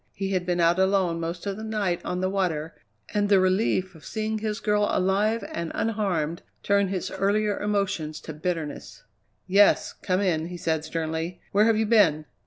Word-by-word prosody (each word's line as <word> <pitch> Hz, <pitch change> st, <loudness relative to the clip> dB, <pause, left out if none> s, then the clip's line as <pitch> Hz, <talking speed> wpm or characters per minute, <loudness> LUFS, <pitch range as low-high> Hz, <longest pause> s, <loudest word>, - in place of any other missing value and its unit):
He 195 Hz, 0 st, -3 dB
had 180 Hz, -2 st, -1 dB
been 175 Hz, -1 st, 0 dB
out 170 Hz, +2 st, +3 dB
alone 190 Hz, -3 st, +2 dB
most 170 Hz, +2 st, -4 dB
of 200 Hz, -1 st, -3 dB
the 220 Hz, -, -7 dB
night 210 Hz, -5 st, -1 dB
on 180 Hz, 0 st, -3 dB
the 185 Hz, -, +1 dB
water, 165 Hz, -5 st, -1 dB, 0.4 s
and 205 Hz, -1 st, +1 dB
the 200 Hz, -2 st, +6 dB
relief 185 Hz, 0 st, +1 dB
of 160 Hz, -, -16 dB
seeing 220 Hz, 0 st, -3 dB
his 215 Hz, 0 st, -3 dB
girl 210 Hz, -1 st, +1 dB
alive 205 Hz, +5 st, +1 dB
and 170 Hz, -1 st, -3 dB
unharmed 190 Hz, -8 st, -1 dB, 0.2 s
turned 200 Hz, -1 st, +2 dB
his 185 Hz, -2 st, -3 dB
earlier 205 Hz, +1 st, 0 dB
emotions 195 Hz, -7 st, -1 dB
to 160 Hz, -, -7 dB
bitterness. 155 Hz, -1 st, -4 dB, 0.4 s
"Yes, 200 Hz, +2 st, +4 dB
come 185 Hz, -1 st, -1 dB
in," 165 Hz, -5 st, 0 dB
he 175 Hz, 0 st, -7 dB
said 160 Hz, -2 st, -1 dB
sternly. 160 Hz, +2 st, -3 dB
"Where 205 Hz, +2 st, +4 dB
have 225 Hz, -1 st, +3 dB
you 220 Hz, -, +2 dB
been?" 190 Hz, -9 st, +4 dB
190 Hz, 185 wpm, -26 LUFS, 170-205 Hz, 0.4 s, the